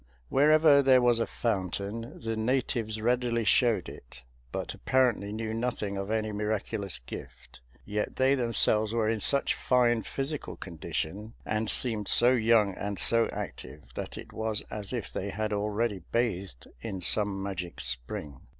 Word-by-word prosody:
Wherever 150 +1 +6
there 130 -2 +6
was 120 -1 +3
a 115 - 0
fountain, 105 +1 -3
the 115 -1 -3
natives 110 -2 -1
readily 120 0 +1
showed 110 -6 +3
it, - - -12 0.3
but - - -4
apparently 125 -6 +1
knew 110 +1 -3
nothing 115 -4 -2
of 100 +1 -4
any 110 -1 -1
miraculous 105 -1 -2
gift; - - -10 0.3
yet 105 0 -3
they 130 +1 +3
themselves 115 -3 +3
were 110 -2 +1
in 110 0 0
such 140 +6 +3
fine 120 -2 +2
physical 140 +5 -4
condition, 95 +5 -5
and 110 0 -1
seemed 110 -5 0
so 120 +1 +5
young 110 -4 +3
and 100 +1 -4
so 115 0 +3
active, - - -8
that - - -6
it - - -10
was 110 -1 -2
as 105 -2 -4
if 120 -7 -4
they 100 - -3
had 110 +1 -2
already 105 0 -1
bathed 100 - -1 0.2
in 95 +3 -5
some 100 +1 +2
magic 90 -3 -5
spring. 65 +2 -3
110 Hz, 150 wpm, -29 LUFS, 100-120 Hz, 0.3 s, Wherever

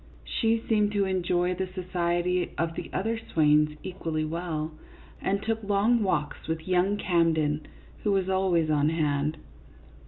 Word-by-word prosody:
She 225 0 +1
seemed 210 -2 +2
to 200 -1 +2
enjoy 180 -1 +1
the 190 +1 -3
society 180 -1 -1
of 165 0 0
the - - -6
other 225 +4 -1
swains 150 -6 +2
equally 165 -4 -3
well, 160 -1 -3 0.5
and 200 +1 0
took 225 0 -1
long 210 +3 +2
walks 160 -7 -1
with 160 +1 -3
young 185 +3 +2
Cam 170 -4 +2
den, 150 -1 -1 0.3
who 210 - +1
was 190 -2 +1
always 185 -4 +2
on 150 0 +3
hand. 150 -1 0
180 Hz, 150 wpm, -27 LUFS, 160-195 Hz, 0.5 s, on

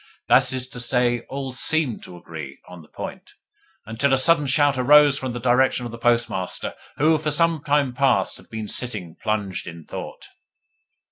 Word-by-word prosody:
That - - +5
is 130 -1 -2
to 125 - -6
say, 120 0 +1
all 135 -1 -5
SEEMED 145 -2 0
to 90 - -11
agree 80 -5 -9
on 90 -1 -11
the 75 - -18
point; - - -9 0.5
until 120 +6 0
a - - 0
sudden 150 +1 +4
shout 145 +1 +3
arose 145 +2 +5
from 130 -1 -4
the 120 - -5
direction 125 +1 +2
of 120 - -6
the 115 - -9
Postmaster, 115 -6 0 0.2
who 155 +2 +3
for 155 0 -2
some 160 0 +1
time 145 -3 +1
past 135 +1 +1
had - - -18
been 110 -1 -6
sitting 100 -9 -3
plunged 105 -4 -2
in 85 -1 -9
thought. - - -8
125 Hz, 180 wpm, -22 LUFS, 110-145 Hz, 0.5 s, That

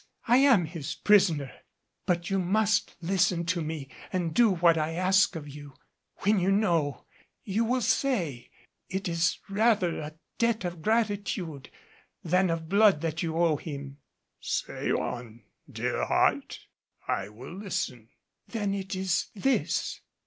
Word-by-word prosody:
I 240 +2 +6
am 260 -10 +5
his 155 -2 -6
prisoner. 170 -10 +3 0.6
But 175 0 0
you 195 - +2
must 210 +4 +1
listen 175 -1 +1
to 175 0 0
me 155 -3 -4 0.2
and 175 -4 -1
do 235 +2 +5
what 170 -3 +4
I 160 0 -1
ask 185 +2 +3
of 150 -2 -6
you. 145 0 -10 0.5
When 205 +1 +3
you 185 +2 +2
know, 170 -9 +1 0.4
you 210 +3 0
will 250 +1 0
say, 185 - 0 0.4
it 190 0 -3
is 170 +1 +1
rather 200 -4 +2
a 155 0 -7 0.2
debt 230 -4 +1
of 175 -2 -5
gratitude 200 - -1 0.5
than 180 +2 +2
of 165 -1 -2
blood 200 -3 +4
that 165 -1 -2
you 165 -1 -2
owe 165 -3 +3
him." 140 -2 -7 0.4
"Say - - -3
on, 120 -2 -3 0.3
dear - - -2
heart, - - +1 0.5
I 95 - -1
will 120 +9 -10
listen." 130 - -4 0.4
"Then 205 -4 -2
it 195 -1 -4
is 185 -2 0
this." 265 +6 0
175 Hz, 140 wpm, -28 LUFS, 155-200 Hz, 0.6 s, I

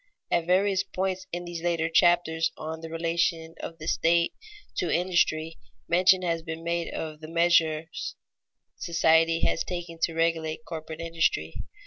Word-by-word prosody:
At 170 -1 +1
various 190 +1 +3
points 190 -1 -3
in 175 +1 -4
these 175 -1 -6
later 170 -1 0
chapters 165 -1 +3
on 160 +1 -6
the 165 - -7
relation 165 0 -1
of 165 - -7
the 155 - -9
state 170 +1 +2 0.4
to 175 - 0
industry, 165 -3 +1 0.3
mention 185 +2 +4
has 165 -2 0
been 165 0 -6
made 170 0 -1
of 155 -1 -5
the 155 - -8
measures 165 -1 +1 0.6
society 165 0 +3
has - - +1
taken 175 -2 -6
to 165 0 0
regulate 165 -1 0
corporate 160 -1 -7
industry. 165 - 0
165 Hz, 145 wpm, -27 LUFS, 160-175 Hz, 0.6 s, mention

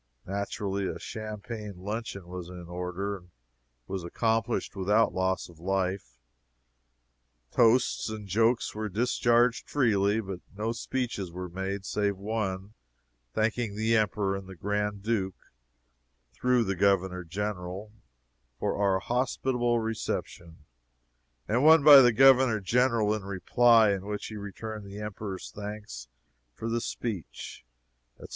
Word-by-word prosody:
Naturally, 100 0 -2
a - - -4
champagne 110 -1 -6
luncheon 100 -1 -5
was 90 -1 -7
in 90 -1 -9
order, 90 +3 -3
and 90 -1 -19 0.6
was 95 +5 -4
accomplished 115 +5 -1
without 105 +4 +2
loss 95 0 0
of 85 -2 -17
life. 95 -8 -2 1.3
Toasts 120 0 +3
and 110 -2 -6
jokes 115 +4 +2
were 110 0 -3
discharged 120 +2 +2
freely, 105 -6 +2
but 95 -4 -5 0.2
no 110 +2 -1
speeches 115 -6 -3
were 90 +1 -6
made 95 +2 -4
save 100 -1 0
one 100 -1 -3 0.6
thanking 110 -1 0
the 110 +2 +2
Emperor 105 -2 +1
and 95 -1 -7
the 95 - -9
Grand 105 +2 -2
Duke, 100 -4 -2 0.8
through 125 - +2
the 100 -2 -1
Governor 95 -1 +2
General, 95 +2 -4 0.7
for - - -1
our 100 -2 +2
hospitable 120 +2 0
reception, 85 -7 -4 0.8
and 120 +5 +1
one 160 -1 +7
by 145 -2 +11
the 120 -1 +6
Governor 130 -1 +6
General 115 0 +2
in 110 - -2
reply, 110 +3 +4
in 100 0 -3
which 105 0 -4
he 110 - -7
returned 105 +1 -6
the 100 +1 -9
Emperor's 105 -2 -6
thanks 105 - -7 0.5
for 115 - -5
the 115 +1 0
speech, 105 - -5 0.5
etc. - - -12
105 Hz, 130 wpm, -28 LUFS, 95-115 Hz, 1.3 s, by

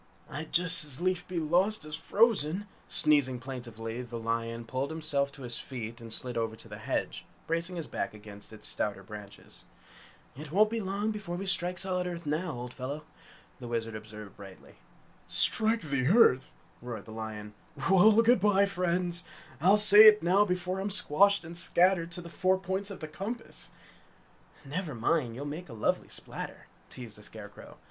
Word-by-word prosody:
"I'd 155 +3 -7
just 165 -3 +2
as 145 -2 -7
lief 180 0 -1
be 180 - -5
lost 175 +4 +1
as 155 0 -5
frozen!" 200 0 +1 0.2
Sneezing 145 -4 +4
plaintively, 120 -2 -7
the 120 -1 -7
lion 115 0 -3
pulled 130 +4 -3
himself 150 -3 -1
to 140 - -11
his 120 -1 -5
feet 120 -2 -7
and 115 -1 -10
slid 125 +2 -2
over 110 -1 -2
to - - -14
the - - -9
hedge, - - -3 0.2
bracing 170 +2 -2
his 165 -3 -4
back - - -4
against 105 -1 -13
its 110 -1 -8
stouter 100 -2 -2
branches. 105 0 -12 0.7
"It 150 +2 -9
won't 210 +4 +4
be 230 - -1
long 200 +2 -2
before 200 -5 -5
we 190 +3 -5
strike 180 -1 +3
solid 180 -1 0
earth 170 -2 -6
now, 155 +3 -2
old 125 0 -7
fellow," 140 +4 -6 0.6
the 120 - -8
Wizard 115 -1 -3
observed 105 -1 -10
brightly. 95 -2 -13 0.5
"Strike 225 +1 0
the 140 -4 -1
earth!" 155 - +4 0.3
roared 120 -2 -7
the 110 - -11
lion. 110 -1 -7 0.3
"Well, 210 +4 +6
good 240 -1 +4
bye, 200 -1 +4
friends! 180 -2 -1 0.4
I'll 190 +5 +5
say 210 +1 +10
it 215 -2 +7
now 190 +4 +4
before 180 0 -2
I'm 195 +2 -2
squashed 200 0 +4
and 165 +1 -9
scattered 175 0 +3
to 175 - -3
the 170 - -10
four 185 +2 +1
points 190 +2 -3
of 200 - -8
the 155 - -5
compass!" 210 +9 -6 1.0
"Never 150 0 -4
mind, 120 0 0
you'll 140 +4 -6
make 155 +3 -6
a - - -9
lovely 110 - -1
splatter!" - - -7 0.2
teased 115 -4 -9
the - - -13
Scarecrow. - - -10
160 Hz, 175 wpm, -29 LUFS, 120-190 Hz, 1.0 s, say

